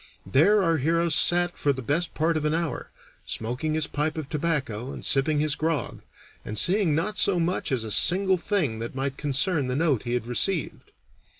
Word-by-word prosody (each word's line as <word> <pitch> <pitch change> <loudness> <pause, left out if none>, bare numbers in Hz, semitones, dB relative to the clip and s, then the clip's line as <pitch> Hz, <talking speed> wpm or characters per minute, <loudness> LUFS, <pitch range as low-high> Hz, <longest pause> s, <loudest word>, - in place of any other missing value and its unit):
There 180 - +4
our 165 -2 +2
hero 165 +4 +1
sat 175 +3 +1
for 145 - +2
the 130 -2 -5
best 155 +7 -1
part 160 +1 +1
of 155 - -1
an 150 +1 0
hour, 165 -2 -3 0.4
smoking 125 +8 -3
his 155 -1 0
pipe 150 +2 -3
of 155 -3 -4
tobacco 140 -6 -2
and - - -7
sipping 145 +2 +2
his 150 0 0
grog, 155 -6 -2 0.4
and 110 - -5
seeing 180 - +2
not 200 +7 -1
so 190 -3 +3
much 170 -1 -1
as 125 -4 0
a 110 - -5
single 190 - +4
thing 165 - -1
that 115 +3 -6
might 135 0 -3
concern 145 +1 0
the 125 - -2
note 145 -5 +1
he 120 0 -3
had 120 - -2
received. 150 +8 -2
155 Hz, 195 wpm, -25 LUFS, 135-170 Hz, 0.4 s, There